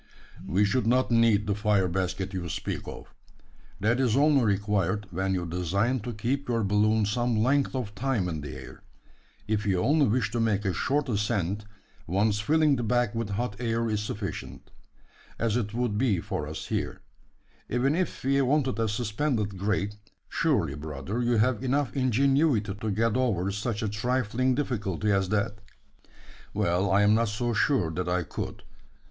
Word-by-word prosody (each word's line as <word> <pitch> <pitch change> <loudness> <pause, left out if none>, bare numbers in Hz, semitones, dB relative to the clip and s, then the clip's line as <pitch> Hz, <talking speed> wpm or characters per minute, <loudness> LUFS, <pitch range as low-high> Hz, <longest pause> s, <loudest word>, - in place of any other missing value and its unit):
"We 100 +4 +3
should 120 +3 +1
not 125 +1 +2
need 115 -3 +4
the 105 - 0
fire 105 -2 +2
basket 95 +2 -2
you 90 -2 -4
speak - - -4
of. - - -9 0.7
That 110 +5 +2
is 125 -2 +2
only 145 -2 +4
required, 100 -1 0
when 95 +2 -1
you 90 -1 -2
design 95 +9 0
to 120 +3 -5
keep 125 +5 -2
your 115 -2 +1
balloon 105 +2 +2
some 120 +3 0
length 135 +5 +2
of 115 -6 -3
time 115 -4 -1
in 80 -4 -3
the 70 - -7
air. - - -11 0.7
If 105 0 -1
you 95 -2 +2
only 145 - +3
wish 110 -1 +1
to 120 - -1
make 105 -2 +1
a 95 - +1
short 145 +8 0
ascent, 105 -3 -1 0.4
once 100 +4 +1
filling 150 +5 +3
the - - -2
bag 120 -1 +1
with 115 -2 -3
hot 100 +1 -3
air 115 -1 0
is 105 -1 0
sufficient; 100 -4 -6 0.7
as 115 -2 0
it 110 -4 -1
would 115 -2 -1
be 115 -8 +2
for - - -4
us - - -6
here. - - -2 0.7
Even 125 +4 +1
if 180 +2 -2
we 140 +1 +3
wanted 135 -2 +1
a 115 - +2
suspended 105 -1 -1
grate, 100 +1 -1 0.3
surely, 115 - +1
brother, 75 - -4
you 120 0 +1
have 125 +2 +2
enough 135 +1 0
ingenuity 135 -3 +2
to 105 +2 -4
get 110 +2 +1
over 100 -8 +1
such 105 +2 -3
a - - 0
trifling 125 +3 0
difficulty 105 - -1
as 95 -2 +1
that?" 105 0 -1 1.0
"Well, 90 +3 +1
I'm 100 +2 +5
not 115 +1 +3
so 120 +3 -1
sure 115 - +2
that 90 +2 -3
I 90 0 +1
could. - - -6
110 Hz, 170 wpm, -27 LUFS, 100-125 Hz, 1.0 s, I'm